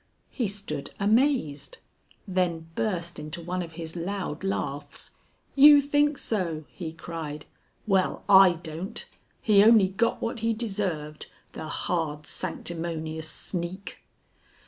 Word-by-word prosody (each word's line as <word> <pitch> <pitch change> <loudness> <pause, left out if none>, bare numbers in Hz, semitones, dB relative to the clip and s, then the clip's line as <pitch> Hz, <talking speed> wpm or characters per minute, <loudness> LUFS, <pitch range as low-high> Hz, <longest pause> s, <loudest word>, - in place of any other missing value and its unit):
He 240 - -1
stood 195 -8 -4
amazed, 220 - +1 0.5
then 170 -3 -1
burst 175 -5 -2
into 155 +3 -6
one 180 +2 -3
of 165 -2 -7
his 165 0 -6
loud 180 -2 -4
laughs. 145 -7 -3 0.4
"You 290 +1 +9
think 290 +1 +2
so?" 170 -8 -2
he 165 -4 -6
cried. 160 -2 -6 0.4
"Well, 190 -3 +1
I 190 -2 +8
don't. 165 +2 -6 0.4
He 205 -2 +6
only 215 -3 +6
got 230 +5 0
what 230 +1 -3
he 225 +1 +1
deserved, 195 -9 -3 0.3
the 155 - -6
hard, 150 -3 -2
sanctimonious 160 -2 -4
sneak!" 180 +4 -5
180 Hz, 120 wpm, -27 LUFS, 160-205 Hz, 0.5 s, You